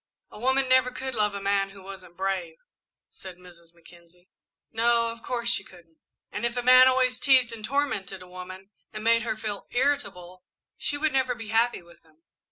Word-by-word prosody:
"A - - -11
woman 265 +3 +2
never 255 0 +4
could 260 +1 -5
love 210 -3 0
a - - -3
man 195 0 0
who 195 -1 -14
wasn't 185 -3 -11
brave," 185 -4 -2 0.5
said 185 -2 -11
Mrs. 170 -2 -16
Mackenzie. 175 +1 -19 0.4
"No, 230 +1 +2
of 230 0 -11
course 235 -1 -3
she 235 - +2
couldn't." 170 -4 -18 0.3
"And 205 - -5
if 235 +1 -1
a 245 - -1
man 255 +1 +8
always 255 -1 +2
teased 255 -4 +4
and 220 -2 -9
tormented 220 -8 -2
a - - -15
woman, 185 +2 -10 0.2
and 215 0 -7
made 230 +1 +4
her 225 -2 -3
feel 210 -2 -5
irritable, 240 -10 -2 0.3
she 290 - -2
would 305 0 0
never 260 -2 +1
be 225 -2 -9
happy 230 -2 +1
with 170 0 -19
him." 160 0 -29
215 Hz, 190 wpm, -26 LUFS, 185-250 Hz, 0.5 s, man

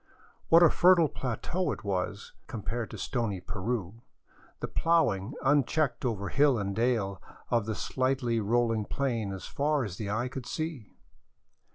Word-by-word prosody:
What 165 +1 +8
a 165 - +7
fertile 175 -3 +5
plateau 135 - -2
it - - -6
was, 100 +1 -3
compared 115 +1 -4
to - - -8
stony 115 -7 -2
Peru, 100 +2 -4 0.6
the - - -3
plowing 130 - +1
unchecked 140 -2 +2
over 100 -5 -1
hill 140 -3 +4
and 100 -2 -2
dale 110 -6 0 0.3
of 115 -3 +2
the 110 - -1
slightly 130 -2 0
rolling 115 0 +1
plain 115 -7 -1
as 95 -1 -6
far 145 0 0
as 95 -5 -5
the 105 -3 -4
eye 115 +4 0
could 125 -1 -7
see 155 -9 -4
120 Hz, 150 wpm, -29 LUFS, 105-140 Hz, 0.6 s, What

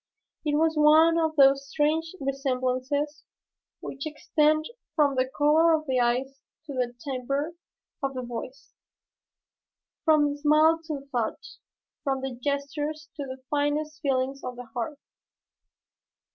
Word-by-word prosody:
It 295 -2 0
was 320 +1 +3
one 315 +2 +6
of 320 -1 0
those 275 -1 +5
strange 320 +4 0
resemblances 275 +1 -1 0.6
which 275 +3 -5
extend 305 0 +1 0.3
from 290 -3 +3
the 260 0 0
color 310 +4 +4
of 310 0 -4
the 260 -3 +1
eyes 255 +3 0 0.3
to 290 - -7
the 245 -2 -2
'timbre' 275 +4 -3 0.5
of 275 -1 -2
the 255 - -3
voice, 245 +3 -7 1.3
from 305 -2 +4
the 285 - -5
smile 310 +2 +4
to 305 -4 -4
the - - -18
thought, 235 -3 -2 0.6
from 270 -2 -1
the 265 0 -3
gestures 290 +4 -3
to 290 -3 -4
the 260 0 -8
finest 295 +1 -1
feelings 270 0 -1
of 250 - -5
the 245 0 -8
heart. 245 +4 -3
285 Hz, 135 wpm, -27 LUFS, 260-305 Hz, 1.3 s, one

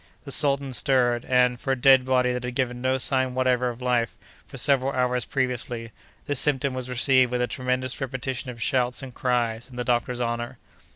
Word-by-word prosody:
The 140 - -8
sultan 140 -2 +1
stirred, 120 -2 +1
and, 125 -1 +2
for 135 - -1
a - - 0
dead 130 0 +5
body 125 -1 +2
that 125 0 -4
had 125 0 -5
given 125 -2 -1
no 130 +1 +1
sign 130 -1 0
whatever 125 -1 +1
of 120 +1 -8
life 120 -3 0 0.3
for - - -9
several 135 0 +3
hours 125 -1 0
previously, 125 -4 -3 0.3
this 145 -4 -1
symptom 140 -2 +2
was 130 -1 -4
received 130 0 +3
with 125 - -1
a - - +3
tremendous 130 +1 -2
repetition 130 0 -4
of 120 -2 -8
shouts 125 +2 0
and 130 -2 -8
cries 120 -2 -1
in 125 - -13
the 125 - -3
doctor's 120 0 -1
honor. 120 +1 -3
125 Hz, 195 wpm, -25 LUFS, 125-130 Hz, 0.3 s, dead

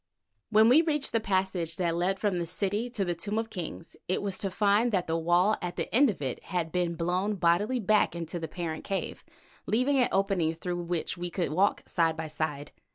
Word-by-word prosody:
When 215 +1 +6
we 265 +7 +7
reached 300 -4 0
the 230 - +2
passage 190 -5 -1
that 170 -1 0
led 180 +3 0
from 195 -3 0
the 170 - -3
city 205 +6 -1
to 220 -5 -2
the 175 - 0
Tomb 200 +6 -3
of 225 0 -2
Kings, 170 -2 -7
it 185 - -1
was 195 -2 -2
to 195 - -1
find 205 +4 +2
that 185 -4 +1
the 165 - -1
wall 175 +5 +3
at 175 -1 -4
the - - -4
end 270 +3 +6
of 185 -8 -4
it 130 - -4
had 175 -3 -2
been 175 -1 0
blown 180 +5 0
bodily 195 +8 +2
back 210 -3 +2
into 170 0 -4
the 160 - -4
parent 160 0 -5
cave, 195 -1 -4 0.4
leaving 260 +5 +2
an 250 - +3
opening 190 -5 +1
through 175 +1 -4
which 175 +1 -2
we 175 0 -3
could 175 -2 -2
walk 190 +6 +1
side 165 -3 +1
by 160 -1 -4
side. 150 -1 -3
180 Hz, 220 wpm, -28 LUFS, 170-210 Hz, 0.4 s, we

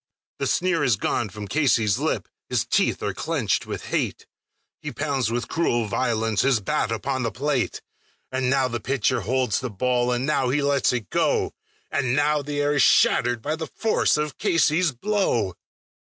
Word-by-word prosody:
The - - 0
sneer 185 -2 +1
is 120 - +3
gone 105 +2 -1
from 105 +1 -8
Casey's 115 -8 +2
lip, - - -1 0.2
his - - 0
teeth - - +1
are - - -1
clenched - - -1
with - - -5
hate; - - -1 0.6
He - - -5
pounds 140 -6 -1
with 120 0 -2
cruel 120 -9 0
violence 110 -1 0
his 135 -4 +3
bat 105 +2 -1
upon 130 +4 -2
the 115 -2 -1
plate; 140 -1 -1 0.5
And 130 -1 0
now 135 -1 +2
the 120 -1 -3
pitcher 130 0 0
holds 125 -2 0
the 125 - -4
ball, 125 +4 0
and 125 +1 0
now 135 -4 +1
he 140 +3 +1
lets 140 -1 +2
it 120 -5 -4
go, - - +1 0.4
And 130 -3 0
now 150 +1 +2
the 145 +1 -4
air 145 0 +1
is 140 - +2
shattered 120 -1 +3
by 155 +2 -1
the 160 0 -5
force 220 -7 +1
of 150 -1 -3
Casey's 165 0 +2
blow. 125 - 0
130 Hz, 180 wpm, -24 LUFS, 115-145 Hz, 0.6 s, is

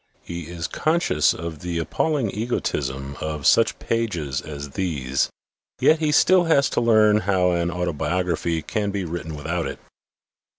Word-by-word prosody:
He 85 -2 -6
is 85 -1 -5
conscious 155 - +2
of 80 -2 -6
the 85 +1 -4
appalling 125 - 0
egotism 70 - -3
of 80 -2 -4
such 115 -2 +4
pages 90 -13 -2
as 70 -2 -7
these; 70 -7 -1 0.5
yet 155 - +4
he 155 - 0
has 150 - +2
still 185 -1 +5 0.2
to 140 - +1
learn 110 -2 +5
how 95 -2 +2
an 85 0 0
autobiography 85 -1 -1
can 105 -3 -2
be 100 -2 -3
written 80 -2 -5
without 80 +3 -2
it. - - -6
85 Hz, 145 wpm, -23 LUFS, 80-105 Hz, 0.5 s, still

